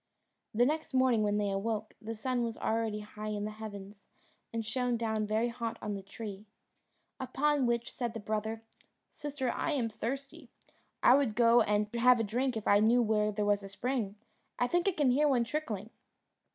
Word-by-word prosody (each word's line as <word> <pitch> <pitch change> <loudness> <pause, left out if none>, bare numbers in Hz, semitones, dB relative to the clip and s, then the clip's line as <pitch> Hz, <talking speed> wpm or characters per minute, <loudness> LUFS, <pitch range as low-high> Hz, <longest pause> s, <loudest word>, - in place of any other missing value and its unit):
The 240 +3 +3
next 305 -1 -1
morning, 255 -4 +4
when 210 0 +1
they 205 -1 0
awoke, 215 +2 -2
the 225 +1 -5
sun 250 +3 -1
was 230 -1 -2
already 220 -1 -1
high 210 0 -8
in 210 -1 -2
the 215 - -3
heavens, 205 -2 -9 0.5
and 230 -1 -3
shone 245 +2 0
down 220 -2 -1
very 220 +3 +1
hot 230 -1 -4
on 210 -1 -3
the 200 - -4
tree. 205 +1 -8 0.7
Upon 270 +1 +1
which 235 0 -1
said 240 -2 -3
the - - -3
brother, 220 +1 -3 0.5
"Sister, 280 -4 -3
I 325 - -1
am 245 -5 0
thirsty; 270 +5 -5 0.5
I 245 - +8
would 265 -6 +2
go 235 0 +6
and 210 -1 +2
have 245 +1 +5
a - - +2
drink 245 +3 0
if 215 - -5
I 205 - +6
knew 235 +3 +4
where 210 -1 +2
there 210 0 -1
was 205 0 +2
a 195 - -8
spring: 210 0 -2 0.4
I 245 - +2
think 350 +8 +1
I 390 - +3
can 290 -6 +3
hear 295 +4 +3
one 255 -4 +3
trickling." 230 -6 -4
225 Hz, 190 wpm, -31 LUFS, 210-250 Hz, 0.7 s, I